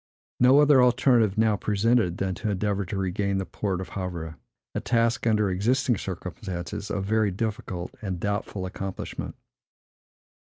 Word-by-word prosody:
No 130 +3 +6
other 145 -3 +6
alternative 120 -4 +4
now 110 -1 +3
presented, 105 -2 +1
than 95 -1 -1
to 110 +4 -3
endeavor 100 0 -1
to 100 +3 -4
regain 95 +1 -1
the 95 - -2
port 95 -2 -3
of 95 - -6
Havre; 85 -4 -5 0.4
a - - -1
task, 115 -1 +1
under 105 -3 +2
existing 120 +7 +2
circumstances, 90 0 -5
of 100 -1 -2
very 110 0 +2
difficult 95 -3 -4
and 95 -4 -3
doubtful 100 -1 -2
accomplishment. 95 0 -5
100 Hz, 140 wpm, -26 LUFS, 95-115 Hz, 0.4 s, No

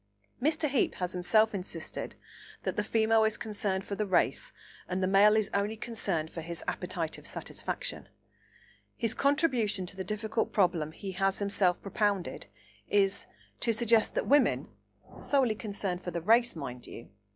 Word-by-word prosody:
Mr. 310 +2 +2
Heape 270 -4 +1
has 180 -1 -3
himself 215 +5 +3
insisted 180 -4 -5 0.5
that - - -2
the - - 0
female 225 0 +3
is 220 0 +1
concerned 205 -4 -2
for - - -5
the 210 +1 -1
race 190 - +1 0.4
and 185 +1 -1
the - - +3
male 200 +2 +6
is 215 -2 +2
only 205 +2 0
concerned 195 -9 -2
for 165 - -6
his 170 +1 -6
appetitive 175 -3 -3
satisfaction. - - -5 0.9
His 230 -1 0
contribution 260 - +1
to 180 - -7
the 190 - -4
difficult 215 +2 -2
problem 170 -6 +2
he 190 +4 -6
has 195 +1 +1
himself 200 -3 +1
propounded 200 - -1 0.4
is, 200 -1 +2 0.3
to 235 - +2
suggest 230 -1 +3
that - - 0
women 290 +1 +3 0.5
(solely 265 -6 +2
concerned 200 -4 -3
for - - -3
the 170 -1 -3
race, 235 +3 +4
mind 125 -5 -7
you!) 115 - -10
205 Hz, 155 wpm, -30 LUFS, 180-225 Hz, 0.9 s, male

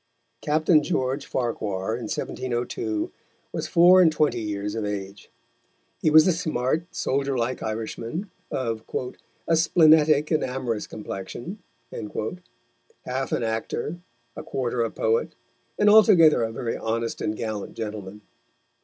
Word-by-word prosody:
Captain 155 +1 +3
George 140 -3 -1
Farquhar, 110 -5 -2
in 120 -1 -5
1702, 120 -4 -3 0.4
was - - -3
four 180 +2 +7
and 165 -3 +5
twenty 150 -6 +1
years 105 -1 -3
of 115 - -3
age. 100 -1 -5 0.7
He - - +3
was 155 +1 +7
a 185 - +4
smart, 155 -1 -1
soldier 135 0 -1
like 120 +2 -1
Irishman, 115 - -4 0.2
of 115 -4 -3 0.6
"a 165 - +4
splenetic 155 -2 +5
and 155 - +2
amorous 125 -4 -3
complexion," 110 - -7 1.5
half 130 +1 -3
an - - 0
actor, 115 +8 -3 0.4
a - - -6
quarter 125 -2 -2
a 115 - +1
poet, 460 - 0 0.4
and 210 - +3
altogether 205 - +7
a 115 -1 -1
very 115 +1 -3
honest 115 +1 -2
and 105 - -1
gallant 110 -3 -4
gentleman. 105 -2 -6
125 Hz, 125 wpm, -25 LUFS, 110-155 Hz, 1.5 s, four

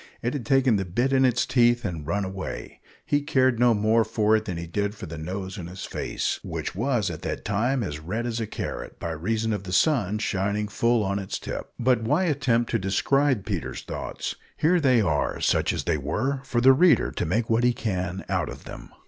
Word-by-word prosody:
It 120 - 0
had 130 -7 -4
taken 135 -5 +4
the 95 - -1
bit 120 +10 0
in 135 0 +5
its 125 -2 +2
teeth 120 -2 +3
and 80 -6 -4
run 100 +3 0
away. 95 0 -6 0.2
He 145 - +1
cared 130 -4 +2
no 120 -2 +5
more 110 +2 +3
for 110 0 +2
it 110 0 0
than 90 - -4
he 85 - -4
did 100 +5 -2
for 100 - -8
the 80 -1 -7
nose 95 +4 -5
on 85 - -6
his 90 +2 -7
face, - - -2
which - - -4
was, 115 0 0
at - - -7
that - - -4
time, 120 +5 +1
as 75 -6 -4
red 100 +9 -3
as 120 -1 -2
a 110 - -2
carrot, - - -6
by 85 - -3
reason 110 +7 -1
of 105 - -2
the 90 - -7
sun 105 - +2
shining 100 0 -1
full 115 +2 +1
on 100 0 -1
its 95 - -4
tip. - - -6
But 125 -1 +2
why 150 +11 +2
attempt 130 -8 +1
to 115 - +1
describe 125 +5 +1
Peter's 95 -8 -4
thoughts? - - -5 0.2
Here 175 +3 +3
they 130 -6 +4
are 80 -7 0
such - - +2
as - - -3
they - - +1
were 115 - -1
for 120 -3 0
the 135 +2 +8
reader 155 -3 +4
to - - -2
make 110 +7 0
what 115 +1 +2
he 125 - +5
can 95 -5 -3
out - - -1
of - - -9
them. - - -10
110 Hz, 225 wpm, -25 LUFS, 95-125 Hz, 0.2 s, the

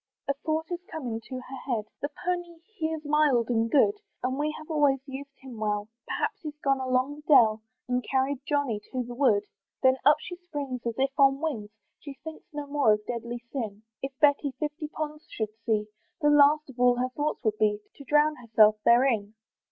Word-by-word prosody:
A 280 - +2
thought 315 0 0
is 350 - -2
come 315 -4 -5
into 225 +3 -5
her 255 +1 -9 0.2
head; 220 -3 0 0.2
"The 285 - -1 0.2
pony 350 -1 -2 0.2
he 315 -6 -1
is 315 -1 -5
mild 290 -6 +3
and 225 -1 +1
good, 405 - +4 0.2
"And 260 +2 -1
we 300 +1 +1
have 310 +1 -9
always 290 -3 +3
used 275 +1 -8
him 255 -4 -10
well; 210 0 -1 0.2
"Perhaps 420 -2 -2
he's 300 -2 -7
gone 275 -1 +2
along 260 +2 0
the - - -12
dell, 225 -7 +6 0.3
"And 250 0 0
carried 265 0 +1
Johnny 285 -7 0
to 255 -1 -1
the 245 0 -8
wood." 240 -6 +3 0.4
Then 260 0 +5
up 295 +1 +6
she 355 +3 -7
springs 290 -8 -5
as 230 - -2
if 270 +1 +1
on 275 0 +5
wings; 265 -10 -3 0.3
She 285 -2 -9
thinks 320 -1 -9
no 295 -1 -5
more 280 -6 +3
of 210 0 -3
deadly 235 0 -5
sin; 220 -6 -4 0.2
If 270 0 -5
Betty 285 -1 +3
fifty 300 +1 -3
ponds 305 0 -6
should 215 -1 -3
see, 215 -2 +2 0.3
The 295 -2 +3
last 295 0 +5
of 245 - -17
all 245 0 +5
her 250 +1 0
thoughts 295 +4 -2
would 215 -2 0
be, 210 -1 +2 0.2
To 280 - -10
drown 300 +2 +3
herself 215 -3 +4
therein. 235 -4 +3
270 Hz, 200 wpm, -28 LUFS, 235-295 Hz, 0.4 s, dell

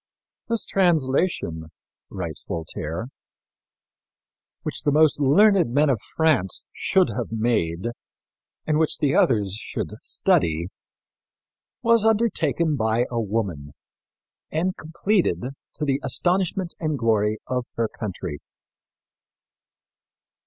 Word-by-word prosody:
"This 230 -1 0
translation," 145 - +1 0.4
writes 85 -5 -5
Voltaire, 80 +5 -4 1.5
"which - - -4
the 145 - +1
most 150 0 +4
learned 180 - +5
men 145 +2 +3
of 120 - -1
France 155 - +2
should 190 -2 +2
have 120 -3 -4
made 110 -7 0 0.8
and 155 -1 +1
which 160 - +2
the 145 -2 +1
others 105 -6 +3
should 105 - -4
study, 85 +1 +1 1.1
was 230 -2 +4
undertaken 185 -8 +2
by 110 0 +1
a 120 -1 0
woman 95 -10 -3 0.8
and 180 +4 -1
completed 165 - 0 0.3
to 150 - -2
the 135 -1 +1
astonishment 180 0 0
and 155 -3 -1
glory 110 -3 +1
of 125 -1 -2
her 115 -1 +1
country." 90 -9 -6
130 Hz, 105 wpm, -24 LUFS, 100-165 Hz, 1.5 s, learned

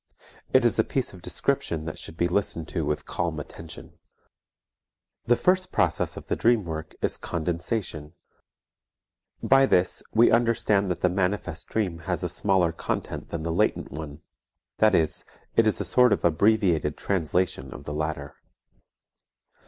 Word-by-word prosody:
It - - +4
is - - +2
a - - +6
piece - - -2
of - - -12
description 80 -2 -1
that 80 - -5
should 80 - -8
be 85 - +2
listened 85 -3 -1
to 85 - -2
with 75 0 -2
calm 85 -3 -2
attention. 80 +2 -10 1.3
The 120 +1 +4
first 185 +5 +1
process 80 -5 0
of - - -8
the - - -1
dream 115 -4 +2
work 80 -1 -6
is - - +2
condensation. 85 -1 -3 1.3
By 135 0 +5
this 90 -5 +2
we 115 +2 +5
understand 115 -4 +2
that 90 -1 -3
the 90 - +3
manifest 95 +2 -2
dream 95 -7 -1
has - - 0
a - - -1
smaller 95 -4 +2
content 85 - -4
than 80 -2 -4
the 85 0 -2
latent - - 0
one, 75 0 -8 0.6
that 110 -2 +5
is, 80 -1 +1 0.3
it 115 - +4
is 110 - +3
a - - -1
sort 125 -2 +4
of 100 - -1
abbreviated 85 -3 +2
translation 90 -6 -1
of 65 - -9
the 75 - -5
latter. 75 -2 -3
85 Hz, 155 wpm, -26 LUFS, 80-105 Hz, 1.3 s, a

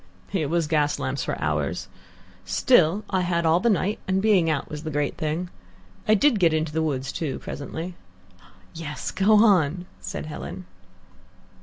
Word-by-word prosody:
"It 160 -7 0
was 170 0 +1
gas 150 -1 +1
lamps 130 +1 -2
for - - -3
hours. - - -1 0.6
Still, 195 -4 +3
I 190 -2 +2
had 170 -1 0
all 165 +2 +4
the 235 - +2
night, 205 0 +1
and 190 0 +2
being 195 -5 +3
out 150 -3 -1
was 150 -1 -6
the 160 - -5
great 145 -1 -1
thing. 160 +3 -3 0.6
I 215 - +6
did 235 +1 +3
get 165 -3 +4
into 155 0 -1
woods, 135 -4 -1
too, 150 -5 -3
presently." 165 +5 -6 0.8
"Yes, 155 -3 -5
go 205 +2 +4
on," 185 -6 +4
said - - -5
Helen. 175 +4 -7
165 Hz, 160 wpm, -25 LUFS, 150-190 Hz, 0.8 s, I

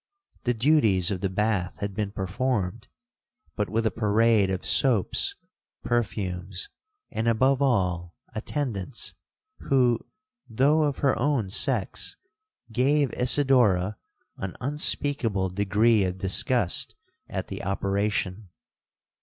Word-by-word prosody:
The 120 -1 +1
duties 110 - +3
of 95 -2 -3
the 95 - 0
bath 100 -2 -1
had 100 -1 -4
been 105 0 -2
performed, 105 +2 -2 0.7
but 105 - -1
with 115 +1 0
a 110 - +2
parade 110 -1 +3
of 95 -1 -3
soaps, 120 -8 +2 0.5
perfumes, 95 -5 -2 0.4
and, 115 - -2
above 130 +4 +3
all, 90 -10 0 0.2
attendants, 115 -2 -3 0.5
who, 125 -4 +2 0.5
though 145 +7 +3
of 145 -2 -1
her 135 - +4
own 130 -10 0
sex, - - 0 0.5
gave 135 +3 +2
Isidora 120 -7 +3 0.4
an 95 -1 -5
unspeakable 130 -7 0
degree 100 +3 +3
of 90 0 -2
disgust 95 +2 +2 0.3
at - - -4
the - - -6
operation. 100 0 -1
110 Hz, 110 wpm, -26 LUFS, 95-125 Hz, 0.7 s, her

